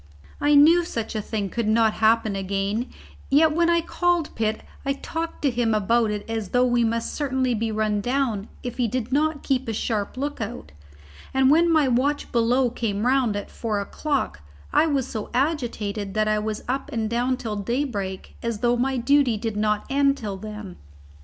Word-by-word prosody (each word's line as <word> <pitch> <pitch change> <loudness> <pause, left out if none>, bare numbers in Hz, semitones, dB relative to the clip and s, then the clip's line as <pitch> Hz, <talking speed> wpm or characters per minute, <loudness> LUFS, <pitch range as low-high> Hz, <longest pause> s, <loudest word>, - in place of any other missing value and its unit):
I 295 0 +3
knew 325 +5 +7
such 230 -9 -4
a 215 - -2
thing 205 -2 -3
could 235 -2 -1
not 220 0 +3
happen 220 -2 +3
again, 195 +4 -1 0.4
yet 305 +3 +5
when 340 +2 +2
I 340 0 +3
called 350 -1 0
Pitt 220 -1 -1 0.2
I 275 - 0
talked 325 +4 -5
to 280 - +3
him 235 -2 +1
about 225 +2 +2
it 210 -1 -4
as 225 -4 -3
though 250 0 +3
we 240 -1 +2
must 230 0 -1
certainly 265 -3 0
be 225 0 -1
run 215 -1 0
down 245 -4 -1 0.2
if 245 -2 -5
he 245 -2 +1
did 250 +1 -3
not 305 +1 +1
keep 265 -2 0
a 225 - -1
sharp 215 0 -2
look 285 -1 -3
out, 220 - -6 0.6
and 265 0 +5
when 335 +2 +4
my 310 -4 +4
watch 265 +4 0
below 240 +1 +2
came 215 -3 -2
round 255 -4 +2
at 205 - -5
four 215 -3 -2
o'clock, 235 - -2 0.3
I 325 - +4
was 275 -4 0
so 220 -4 -5
agitated 230 -8 -1
that 215 0 +2
I 215 0 +2
was 215 0 -3
up 265 +2 -2
and 225 -2 -1
down 245 +3 0
till 220 -5 -4
daybreak, 205 -4 -3
as 230 -3 -3
though 240 0 +3
my 265 +2 0
duty 255 -1 +3
did 220 0 -3
not 210 0 0
end 275 0 +2
till 205 -5 -5
then. 210 -2 -8
235 Hz, 190 wpm, -24 LUFS, 215-275 Hz, 0.6 s, knew